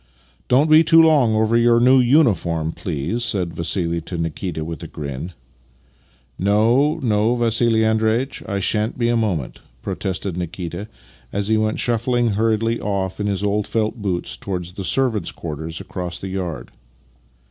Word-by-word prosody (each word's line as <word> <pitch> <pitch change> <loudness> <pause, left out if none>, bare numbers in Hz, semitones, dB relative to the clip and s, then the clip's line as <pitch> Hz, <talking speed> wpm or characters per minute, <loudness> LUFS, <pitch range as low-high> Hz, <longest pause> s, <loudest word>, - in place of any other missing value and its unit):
" - - -36
Don't 135 +5 +4
be 155 +1 +7
too 165 0 +6
long 145 -9 +5
over 110 +1 +2
your 120 0 +4
new 130 +2 +5
uniform, 105 - +2
please," 85 - -3
said 95 -7 0
VassiH 85 0 -2
to 90 - -5
Nikita 80 0 -3
with 80 0 -6
a - - -6
grin. 75 +4 -6 0.5
" 60 0 -36
No, 120 +9 +3
no, 110 0 +2
Vassih 115 -1 +2
Andreitch 110 +4 0
— - - -13
I 100 -1 -1
shan't 105 +4 0
be 120 -1 +1
a 120 - +2
moment," 95 - -2 0.2
protested 95 -1 -3
Nikita 90 +3 -5 0.4
as 100 +1 -2
he 110 - +3
went 110 0 0
shufiQing 120 0 +1
hurriedly 115 +2 +1
off 95 -2 -2
in 105 - -1
his 100 -1 -1
old 105 0 0
felt 110 0 -1
boots 90 -4 -2
towards 90 -3 -5
the 95 +2 -7
servants' 115 -4 0
quarters 80 0 -6
across 90 -2 -5
the 95 - -6
yard. 90 -5 -5
105 Hz, 165 wpm, -21 LUFS, 90-115 Hz, 0.5 s, be